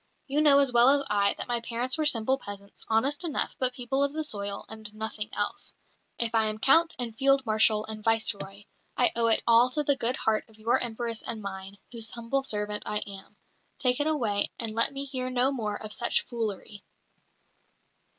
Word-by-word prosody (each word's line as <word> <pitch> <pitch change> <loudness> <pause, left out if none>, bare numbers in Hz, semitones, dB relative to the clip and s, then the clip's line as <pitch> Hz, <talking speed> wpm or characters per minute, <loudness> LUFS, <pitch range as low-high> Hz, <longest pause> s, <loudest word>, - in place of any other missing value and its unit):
"You 290 +2 0
know 290 -2 +6
as 275 -3 +3
well 240 +2 +6
as 280 0 +3
I 200 -1 +2
that - - -6
my 240 -1 0
parents 240 +2 -1
were 310 -1 +1
simple 260 +1 +3
peasants, 200 -2 -11
honest 270 +9 +1
enough, 325 -4 -2
but 255 -1 +1
people 265 +2 0
of 280 0 0
the 315 0 -3
soil 200 -7 -4
and 220 -1 -9
nothing 215 0 -3
else. - - -3 0.4
If 235 -1 +1
I 220 -1 +2
am 215 0 -3
Count 325 +8 +3
and 235 -3 -3
Field 275 +2 +2
Marshal 215 -1 +3
and 215 -1 -8
Viceroy, 205 -3 -1 0.3
I 245 - +4
owe 230 0 +2
it 225 - +3
all 235 +2 +5
to 295 +4 -2
the 285 -1 +2
good 250 -1 -1
heart 220 -2 -1
of 220 - -20
your 225 +2 +1
Empress 230 -1 -3
and 230 - -4
mine, 195 -1 -8
whose 230 -2 -3
humble 235 +3 -2
servant 210 -4 0
I 210 0 -2
am. 200 +1 -11 0.4
Take 250 -1 +2
it 290 - +1
away, 230 -10 0
and 225 -2 -2
let 230 +4 +3
me 275 0 -4
hear 255 -2 -3
no 255 +1 +2
more 215 -6 -3
of 215 -1 -5
such 235 - +1
foolery." 215 -3 -5
230 Hz, 200 wpm, -27 LUFS, 215-265 Hz, 0.4 s, know